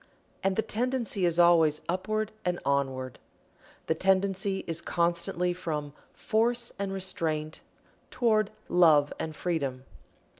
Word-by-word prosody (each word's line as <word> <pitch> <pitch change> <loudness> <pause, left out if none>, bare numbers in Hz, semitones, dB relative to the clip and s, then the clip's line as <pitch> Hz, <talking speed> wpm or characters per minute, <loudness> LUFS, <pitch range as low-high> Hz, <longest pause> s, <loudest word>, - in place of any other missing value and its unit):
And 195 0 +1
the 220 - +1
tendency 235 -5 -1
is 170 -1 +1
always 165 -3 +5
upward 215 +4 -1
and 180 -1 -1
onward. 135 -2 -1 0.7
The - - +1
tendency 190 +2 +1
is 165 0 -2
constantly 175 +1 0
from 150 -5 -4 0.2
Force 235 +2 0
and 200 -1 -2
Restraint 165 -5 -2 0.5
toward 220 -4 +2 0.2
Love 155 -5 +5
and 160 -1 -4
Freedom. 140 -8 -2
175 Hz, 115 wpm, -28 LUFS, 155-200 Hz, 0.7 s, always